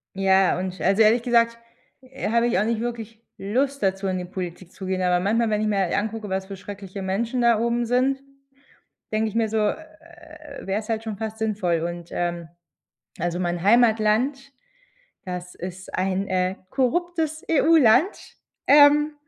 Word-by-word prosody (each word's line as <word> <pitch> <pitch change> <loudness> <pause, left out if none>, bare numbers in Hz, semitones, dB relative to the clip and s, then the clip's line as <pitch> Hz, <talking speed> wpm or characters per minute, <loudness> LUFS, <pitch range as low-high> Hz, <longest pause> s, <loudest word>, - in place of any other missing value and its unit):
Ja, 190 -1 +3
und 185 0 -5
also, 195 +4 +2
ehrlich 225 +2 +4
gesagt, 235 -1 +2 0.4
äh, 260 -3 -6
habe 235 +1 +2
ich 190 -6 +1
auch - - +2
nicht 230 -1 -1
wirklich 230 -1 -6
Lust 265 +8 -1
dazu, 195 0 0
in 185 -1 -1
die 180 - -5
Politik 180 0 -7
zu 190 - -9
gehen. 185 0 -2
Aber 180 -1 +2
manchmal, 220 +5 +1
wenn 210 0 0
ich 215 - 0
mir 205 -2 0
halt 185 -3 0
angucke, 215 0 -3
was 190 0 -2
für 195 0 -8
schreckliche 200 0 -8
Menschen 225 +6 -1
da 235 -2 +4
oben 235 +1 0
sind, 260 +3 +1 0.9
denke 220 0 +1
ich 215 - -9
mir 225 -1 +1
so, 220 - 0
äh, 215 +10 -1 0.8
wäre 195 +2 -1
es 215 - -12
halt 225 0 -2
schon 215 -3 -5
fast 220 0 -5
sinnvoll. 195 -7 0
Und, 175 0 -5
ähm, 175 -1 -3 0.7
also, 175 +2 -2
mein 175 -1 -2
Heimatland, 235 +5 +2 0.7
das 180 -1 -6
ist 185 +1 -8
ein, 190 +1 -1
äh, 185 0 0
korruptes 315 - -1
EU-Land. 310 - +3 0.3
Ähm, 295 +1 +6
215 Hz, 170 wpm, -23 LUFS, 190-235 Hz, 0.9 s, Ähm